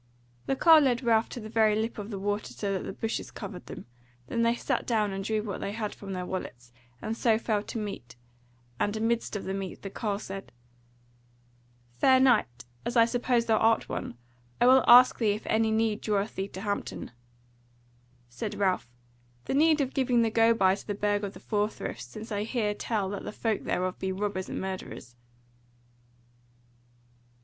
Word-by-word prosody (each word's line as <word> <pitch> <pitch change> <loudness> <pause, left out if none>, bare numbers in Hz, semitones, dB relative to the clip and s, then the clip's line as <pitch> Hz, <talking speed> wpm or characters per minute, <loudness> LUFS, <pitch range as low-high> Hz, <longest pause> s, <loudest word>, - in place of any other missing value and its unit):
The 270 - +1
carle 320 +2 +7
led 250 -1 +1
Ralph 225 -1 +3
to - - -6
the 215 - -7
very 220 -1 +3
lip 220 +1 -2
of 205 +1 -6
the 205 - -4
water 205 +2 -3
so 200 -1 -2
that 190 - -3
the - - -4
bushes 225 0 -4
covered 180 -4 -8
them; - - -8 0.4
there 230 - -2
they 230 0 +3
sat - - -2
down 215 -4 +1
and 195 0 -4
drew 215 +1 -1
what 205 -3 -5
they 200 - -3
had 215 -1 -3
from 195 -1 -8
their 180 -1 -3
wallets, 120 -10 -6 0.3
and 220 - -2
so 225 -1 +3
fell 220 -2 0
to 220 - -6
meat; 195 - -6 0.6
and 205 +1 0
amidst 225 0 -1
of 205 - -3
the 190 - -3
meat 195 -2 -5
the 195 - -6
carle 205 -1 -2
said: 195 -1 -8 1.5
"Fair 260 - +6
Knight, 125 - +2 0.2
as 240 - -2
I 230 - +7
suppose 240 0 +1
thou 225 -1 +3
art 225 0 +2
one, 120 - -5 0.4
I - - +4
will 260 +1 +7
ask 250 +1 +8
thee 215 -4 +3
if 210 - -7
any 220 0 +2
need 220 -1 +1
draweth 210 0 -1
thee 190 +1 -3
to 190 -1 -9
Hampton?" 205 - -4 1.2
Said 125 - -5
Ralph: 190 -10 0 0.6
"The - - -2
need 310 +2 +4
of 265 -1 -2
giving 250 -3 +2
the 225 - +1
go 225 +1 +4
by 190 -3 +4
to 195 - -7
the 205 - -2
Burg 205 0 0
of 200 -1 -4
the - - -11
Four 210 -1 0
Friths, 215 - -6
since 215 - -10
I 205 -1 -1
hear 215 -1 -1
tell 205 -1 -2
that 200 - -5
the - - -5
folk 220 -1 -2
thereof 185 0 -1
be 190 - -2
robbers 190 -1 -3
and - - -4
murderers." 190 -10 -6
215 Hz, 195 wpm, -28 LUFS, 195-230 Hz, 1.5 s, ask